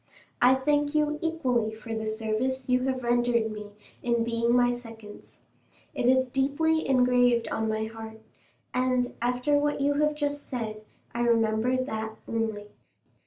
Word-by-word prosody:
I 250 +2 +6
thank 290 +2 +1
you 300 0 +1
equally 255 -9 0
for 225 +1 -7
the 220 0 -3
service 225 +4 -2
you 250 0 +2
have 260 -1 -1
rendered 240 -2 +2
me 210 -1 -7 0.3
in 235 -1 +1
being 230 0 0
my 245 0 +4
seconds. 225 -3 -11 0.6
It 240 - 0
is 260 0 +4
deeply 285 +5 +1
engraved 245 -2 +3
on 220 0 -1
my 220 0 -1
heart, 220 0 -9 0.5
and, 250 0 +1
after 250 +4 +1
what 295 0 0
you 285 +1 +2
have 300 0 +2
just 290 -1 -3
said, 220 -4 -4 0.3
I 235 - -2
remember 230 +1 +2
that 220 -3 -4
only." 220 -2 -2
245 Hz, 150 wpm, -27 LUFS, 225-265 Hz, 0.6 s, I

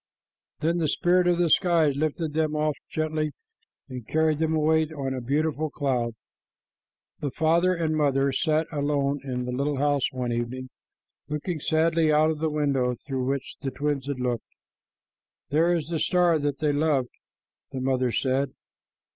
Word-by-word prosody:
Then 165 +2 +1
the 160 - +1
spirit 180 +3 +2
of 175 -1 +3
the 175 -1 +2
skies 165 -6 +3
lifted 155 +1 -1
them 155 -1 0
up 150 0 +1 0.2
gently 155 -1 -1 0.5
and 125 -3 -8
carried 160 -1 +1
them 160 0 +1
away 160 0 +3
on 140 -4 -3
a 130 - -4
beautiful 155 +4 0
cloud. 125 -5 -1 1.0
The 145 - -2
father 170 +6 +2
and 160 -2 0
mother 140 -2 +2
sat 155 +2 +1
alone 145 -1 0
in 125 -2 -3
the 125 - -3
little 140 +3 -1
house 145 -1 +1
one 125 -2 -3
evening, 125 +2 -3 0.6
looking 150 +3 -3
sadly 160 +1 +2
out 155 +1 +4
of 155 - -4
the 160 0 0
window 140 -5 0
through 130 -3 -2
which 135 0 -3
the 135 - -2
twins 140 -1 -2
had 140 -3 -3
looked. 125 -2 -2 1.0
"There 165 +4 +3
is 165 -3 -1
the 165 -2 -1
star 175 -2 +3
that 145 -1 -1
they 150 -1 +1
loved," 145 -4 +1 0.6
the 135 - -4
mother 130 -1 +1
said. 135 +2 0
150 Hz, 165 wpm, -26 LUFS, 135-160 Hz, 1.0 s, out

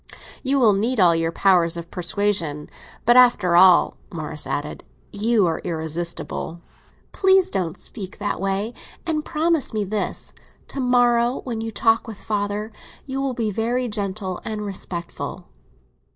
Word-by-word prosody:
"You 275 +1 +1
will 225 -5 +5
need 225 +5 0
all 175 -3 +6
your 165 0 0
powers 170 -2 +3
of 170 0 -8
persuasion. 175 -5 0 0.3
But, 240 +1 +6
after 210 -8 +5
all," 180 0 +6
Morris 155 -3 -5
added, 145 +1 -4 0.3
"you 215 0 +2
are 165 -2 0
irresistible." 165 0 -4 0.5
"Please 380 -1 +3
don't 180 -3 -2
speak 195 -6 -8
that 205 -2 -3
way—and 225 - -3
promise 320 -6 0
me 210 - +1
this. 205 +1 -2 0.4
To - - -6
morrow, 245 -1 +3
when 230 -4 -4
you 225 - -3
talk 225 +1 +2
with 220 -3 -7
father, 205 +1 -3 0.3
you 270 0 -3
will 270 -2 -1
be 225 -3 -1
very 240 +4 -1
gentle 200 -3 -3
and 215 -1 -4
respectful." 175 -3 -6
205 Hz, 140 wpm, -22 LUFS, 175-240 Hz, 0.5 s, all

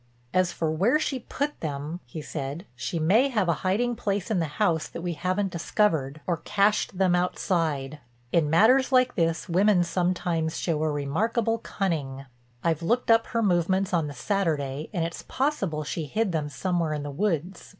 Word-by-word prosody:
"As 185 -1 +2
for 160 -2 -1
where 195 - +3
she 280 -4 -2
put 285 +4 -3
them," 150 +2 -4
he 155 +5 -7
said, 145 +5 -5
"she 125 +7 -3
may 205 - +4
have 210 -8 +1
a 170 - +3
hiding 230 +6 +1
place 205 -1 -2
in 200 - +2
the 165 - 0
house 170 -7 +1
that 170 - -8
we 175 -1 -1
haven't 185 +3 -1
discovered, 160 -5 0
or 175 -2 0
cached 200 +3 +1
them 185 -2 +3
outside. 160 -5 0 0.3
In 160 -3 +2
matters 240 - +5
like 255 -1 +4
this 165 -1 0
women 185 +1 +4
sometimes 175 -2 -1
show 160 -3 -1
a 155 - +1
remarkable 215 - 0
cunning. 145 -11 -3 0.4
I've 165 -1 +1
looked 235 +7 +1
up 225 0 +4
her 230 -1 0
movements 185 0 +1
on 165 -3 +2
the 145 - -7
Saturday 150 -4 -1
and 175 -6 -1
it's 170 - -5
possible 200 - -1
she 155 +2 -3
hid 215 +3 0
them 155 -3 -1
somewhere 170 0 -1
in 150 -1 -3
the 145 - -5
woods. 175 +1 -2
175 Hz, 180 wpm, -26 LUFS, 155-205 Hz, 0.4 s, matters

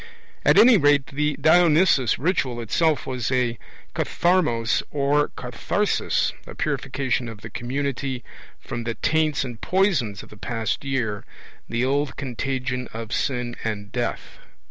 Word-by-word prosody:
At - - +5
any 235 -1 +8
rate 145 -3 +4
the 150 +1 -1
Dionysus 160 - +4
ritual 140 -6 0
itself 145 +5 +1
was 125 -2 -2
a 125 -3 0 0.3
katharmos 155 -11 +1
or 145 +1 +2
katharsis - - 0
a - - -9
purification 130 -2 -1
of 110 -2 -10
the 110 - -9
community 130 +1 -3 0.4
from 120 - -5
the 115 0 -3
taints 155 -1 +1
and 120 -4 -7
poisons 155 - +1
of - - -14
the 105 - -13
past 115 +2 -3
year, 120 -7 -2 0.5
the 120 +2 0
old 140 +1 0
contagion 130 -1 -3
of 115 0 -6
sin 125 -2 -1
and 105 -2 -4
death. 120 -1 -4
130 Hz, 135 wpm, -24 LUFS, 120-145 Hz, 0.5 s, any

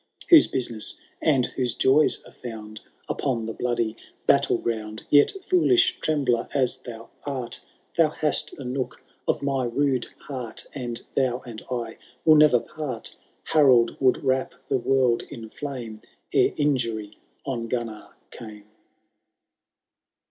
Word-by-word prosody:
Whose 330 -3 +9
business 120 -4 -1 0.3
and 135 -6 +3
whose 125 -1 -2
joys 140 +4 +3
axe - - -18
faaad 110 -3 -7 0.3
Upon 120 -5 -1
the 115 - -4
bloody 120 -2 -1 0.3
battle - - +4
ground. 110 -2 -4
Yet, 145 -1 +7
foolish 370 +1 +3
trembler 135 - +1
as 130 -3 +2
thou 115 -1 -10
art. 130 -4 -4 0.4
Thou 165 -2 +5
hast 155 0 0
a 140 - -8
nook 130 +1 -4 0.2
of - - 0
my 135 -2 0
rude 130 0 0 0.2
heart, 125 -5 -4
And 120 -4 -4
thou 130 -2 +1
and 115 -3 -8
I 120 -2 -4 0.3
will 155 - +8
never 150 -5 +6
part 130 -4 -5
v— - - -32 0.3
Harold 130 -7 +5
would 130 +1 +2
wrap 130 -1 0
the 135 - +2
world 130 -1 +2
in 110 -2 -8
flame 120 -6 -6 0.3
Ere - - +3
injury 115 -8 -1 0.3
on 120 -4 -3
Gunnar 115 -3 -4 0.2
came. 105 -2 -10
125 Hz, 135 wpm, -25 LUFS, 115-140 Hz, 0.4 s, Whose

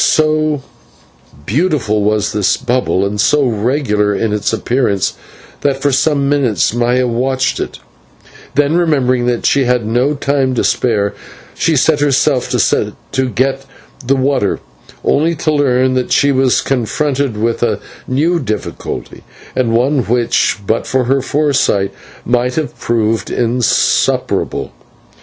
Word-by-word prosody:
So 155 -2 +1 0.8
beautiful 125 - 0
was 105 0 0
this 105 -2 +1
bubble 125 -6 0
and 100 +1 -1
so 145 +5 +3
regular 110 -3 0
its 105 0 -1
appearance 110 -4 0 0.5
that 140 -2 0
for 145 +1 +1
some 140 +1 +1
minutes 135 -8 +1
Maya 120 +1 +1
watched 130 +2 0
it; - - -4 0.8
then, 145 +2 +2
remembering 130 -7 +1
that 120 -1 -1
she 140 -2 +3
had 125 -2 +1
no 125 +7 +1
time 135 -2 0
to - - 0
spare, 105 -4 +1 0.4
she 165 - +1
set 150 +2 +3
herself 140 -2 +1
to 130 -1 -1
get 135 +2 0 0.4
the 135 +3 +2
water, 130 -6 0 0.4
only 165 +4 +2
to 155 0 -1
learn 130 -3 +2
that 130 -1 -1
she 140 - +3
was 130 -2 +2
confronted 135 0 -1
by 115 +2 0 0.2
a - - -5 0.3
new 160 +7 +1
difficulty 110 -8 -5 0.3
and 125 -3 +1
one 130 +5 +2
which 120 +1 +1
but 110 +3 -1
for 130 -1 +1
her 135 +2 +1
foresight 135 -9 +1 0.3
might 125 +1 0
have 155 -2 -3
proved 115 -1 0
insuperable. 120 -1 0
130 Hz, 130 wpm, -15 LUFS, 115-140 Hz, 0.8 s, so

